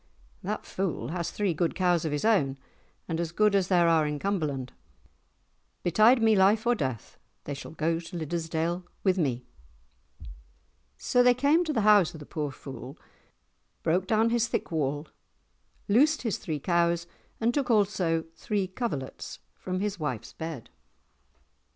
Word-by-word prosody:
"That - - -4
fool 170 -11 -3
has 170 0 -2
three 200 -4 -1
good 165 +1 -1
cows 175 -3 +2
of 155 - -1
his 150 +7 -1
own, 145 -12 +2 0.5
as 165 -1 -2
good 210 +3 +3
as 195 -3 +2
there 175 -3 +4
are 160 -2 +3
in 150 0 -2
Cumberland. 145 -9 -2 1.1
Betide 220 +7 +5
me 220 -1 +5
life 205 +3 +4
or 240 - +4
death, 130 - -4 0.2
they 145 - -5
shall 140 - -8
go 165 +1 0
to 175 +1 -8
Liddesdale 165 +2 -2 0.2
with 190 -1 +2
me!" 125 -6 -1 1.5
So 245 - +2
they 245 0 +5
came 285 +7 +3
to 315 - -1
the 235 -7 +1
house 205 -5 +5
of - - -9
the 150 - -10
poor 150 -1 -3
fool, 135 +1 -9 0.9
broke 180 +3 +1
down 225 +2 +3
his 235 -1 +2
thick - - -3
wall, 150 -1 -1 0.8
loosed 290 +9 +3
his 225 -5 -1
three 155 -3 -3
cows, 170 +1 +1 0.3
and 235 +1 +1
took 280 -2 -1
also 190 -7 +2
three 205 -1 -1
coverlets 185 - -5 0.2
from 185 0 -4
his 205 -2 -2
wife's 130 -8 -4
bed. 160 -7 -7
175 Hz, 155 wpm, -28 LUFS, 155-210 Hz, 1.5 s, Betide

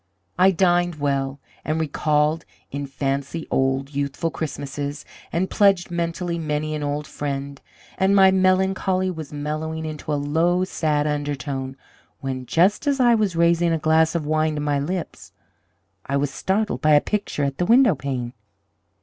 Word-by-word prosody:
"I 185 +1 +7
dined 175 -2 +2
well, 140 -2 -1 0.2
and 155 +1 -1
recalled 155 +1 +1 0.3
in 140 0 -4
fancy 140 +3 -3
old, 135 +1 0
youthful 140 +4 -2
Christmases, 145 -2 -5 0.3
and 180 +3 0
pledged 195 -4 +3
mentally 170 0 -2
many 155 -1 -2
an 150 - -3
old 145 +1 -2
friend, 140 -1 -5 0.4
and 190 +1 +3
my 190 -1 +7
melancholy 185 0 +2
was 160 -4 -7
mellowing 155 +2 -4
into 155 0 -5
a - - +2
low, 165 +5 +1
sad 155 -5 0
undertone, 140 -2 -3 0.4
when, 130 -2 -5
just 190 - +2
as 280 -1 +2
I 240 -2 +5
was 210 -6 +1
raising 170 0 +3
a - - +2
glass 160 +1 +2
of 160 -3 -1
wine 155 0 +1
to 150 - -3
my 145 -1 0
lips, 175 +5 -5 0.7
I 140 - 0
was 140 0 -1
startled 200 +8 -1
by 155 0 +4
a - - +7
picture 205 -5 -2
at 140 -1 -2
the 175 - +2
windowpane. 140 - +2
155 Hz, 155 wpm, -23 LUFS, 145-175 Hz, 0.7 s, I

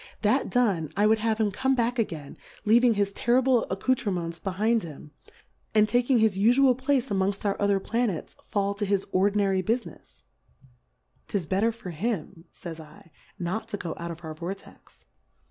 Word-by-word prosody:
That - - +2
done, 195 - +1
I 205 - +4
would 220 +1 +4
have 220 0 0
him 215 -2 +1
come 265 +6 +1
back 240 0 0
again, 160 -10 -3 0.3
leaving 235 +2 +5
his 200 -1 0
terrible 250 +1 +2
Accou 195 +7 +1
terments 180 -9 -3
behind 215 +4 +1
him, 150 -3 -10 0.6
and 215 0 +5
taking 245 +3 +2
his 220 -4 +2
ufual 250 +5 +5
Place 260 0 0
amongft 195 +1 -1
our 200 - +1
other 200 -1 +3
Planets, 225 -4 -2
fall 200 -1 0
to 205 +1 -3
his 195 -1 +1
ordinary 195 0 +2
Bufinefs. 230 +5 -4 1.0
'Tis 195 -5 -2
bet 190 +5 0
ter 230 +1 +3
for 220 -5 -8
him, 180 -2 -4
fays 165 -2 -9 0.4
/, - - -29
not 220 +4 -3
to 210 - -4
go 170 -4 -5
out 170 0 -5
of 170 +1 -8
our 160 -1 -6
Vortex. 175 +5 -9
205 Hz, 170 wpm, -26 LUFS, 185-235 Hz, 1.0 s, leaving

